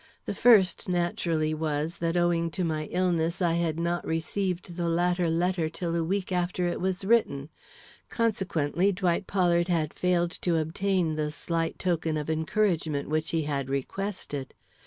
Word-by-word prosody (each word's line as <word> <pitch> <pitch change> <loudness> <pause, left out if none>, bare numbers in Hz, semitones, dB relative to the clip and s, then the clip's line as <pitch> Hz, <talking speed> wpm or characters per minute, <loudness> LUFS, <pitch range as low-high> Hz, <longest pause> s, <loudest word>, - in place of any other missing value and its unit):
The - - -2
first 205 -7 +4
naturally 170 -3 0
was, 155 +1 -2
that 170 +1 0
owing 170 -1 +2
to 185 - +1
my 155 -2 -1
illness 170 -1 0
I 175 -3 +2
had 165 -1 0
not 170 +1 -1
received 175 +2 -2
the 170 -1 -1
latter 175 +1 +1
letter 170 0 +1
till 170 0 -3
a 170 - +1
week 190 +3 -2
after 180 0 0
it 175 - -2
was 190 +1 -1
written; 160 -11 +2 0.6
consequently 190 -5 +1
Dwight 180 0 0
Pollard 175 -3 +2
had 165 -4 0
failed 175 -1 +1
to 170 -2 +1
obtain 165 0 0
the 150 -1 0
slight 165 +1 -2
token 165 -3 0
of 150 +1 -2
encouragement 160 -3 0
which 155 +1 0
he 165 -1 0
had 140 -3 -2
requested. 145 0 -4
170 Hz, 155 wpm, -27 LUFS, 160-180 Hz, 0.6 s, first